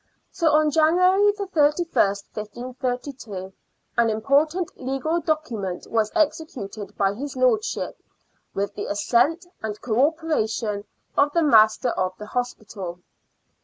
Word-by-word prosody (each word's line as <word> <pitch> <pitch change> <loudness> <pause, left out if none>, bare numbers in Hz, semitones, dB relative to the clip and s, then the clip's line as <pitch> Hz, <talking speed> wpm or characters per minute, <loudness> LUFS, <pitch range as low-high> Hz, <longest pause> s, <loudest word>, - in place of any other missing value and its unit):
So 335 -4 +2
on 305 0 +4
January 365 +6 +4
31st, 315 - +1
1532, 240 -2 -5 0.5
an 235 -1 +4
important 290 +10 +1
legal 270 +6 -1
document 235 - -2
was 220 -2 +1
executed 230 - -2
by 195 -1 +2
his 275 +6 -6
lordship, 260 - +1 0.6
with 200 0 -1
the 205 - -5
assent 245 - +2 0.2
and 215 -1 -4
co 240 +4 +3
operation 225 -10 -2 0.3
of 285 +1 +3
the 335 - +3
master 225 -2 +5
of 185 -4 -2
the 210 - -8
hospital. 210 -7 -5
250 Hz, 115 wpm, -24 LUFS, 210-315 Hz, 0.6 s, master